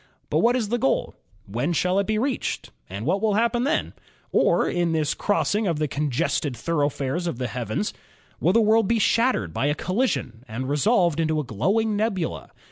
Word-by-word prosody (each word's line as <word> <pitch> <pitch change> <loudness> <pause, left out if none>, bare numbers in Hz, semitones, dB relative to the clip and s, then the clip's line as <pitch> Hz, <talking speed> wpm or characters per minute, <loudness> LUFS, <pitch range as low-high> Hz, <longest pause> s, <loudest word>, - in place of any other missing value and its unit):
But - - +3
what 240 +2 +3
is 225 -5 -1
the 240 +2 0
goal, 135 - 0 0.3
when 120 - -2
shall 180 +5 +1
it 200 - -1
be 215 0 +1
reached 260 +3 -2 0.2
and 100 +4 -5
what 190 +6 +1
will 215 -2 +2
happen 235 +2 +1
then? 285 - 0 0.4
Or, - - +3
in 175 -2 0
this 155 -2 +1
crossing 205 +1 0
of 165 -4 0
the 155 0 0
congested 140 -1 -1
thoroughfares 145 0 -1
of 165 - -3
the 125 - -2
heavens, 120 - -3 0.5
will 180 - +2
the 230 - +5
world 220 -1 +4
be 230 - +2
shattered 225 - +2
by 135 - 0
a 145 - +1
collision 185 - -1
and 120 +3 -4
resolved 170 - +2
into 155 -1 +1
a - - -1
glowing 195 - 0
nebula? 205 -6 -2
175 Hz, 190 wpm, -24 LUFS, 140-220 Hz, 0.5 s, the